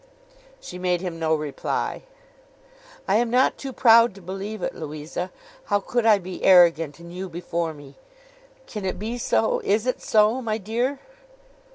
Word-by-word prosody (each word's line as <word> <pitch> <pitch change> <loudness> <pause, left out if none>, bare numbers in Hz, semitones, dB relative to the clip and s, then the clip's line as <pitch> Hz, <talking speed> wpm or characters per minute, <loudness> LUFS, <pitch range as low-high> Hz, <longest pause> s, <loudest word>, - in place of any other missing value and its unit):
She 180 - -9
made 180 -1 0
him 175 -3 -5
no 160 -1 +2
reply. 150 -2 -3 1.1
'I - - +2
am 235 0 +1
not 250 +2 +2
too 275 - -5
proud 230 -4 +5
to 195 - -13
believe 195 +4 -6
it, - - -2
Louisa. 155 +4 -6 0.3
How 205 - +1
could 230 +3 -1
I 215 -2 +7
be 185 -1 -8
arrogant, 170 -5 +5
and 170 0 -12
you 185 +1 -6
before 170 -1 -3
me! 140 -1 -14 0.7
Can 210 - -7
it 185 - -2
be 230 +4 -4
so? 225 -1 +1
Is 210 +3 +1
it 255 - -1
so, 215 +4 +3
my 220 -3 -2
dear? 235 +7 -2
190 Hz, 165 wpm, -24 LUFS, 170-225 Hz, 1.1 s, I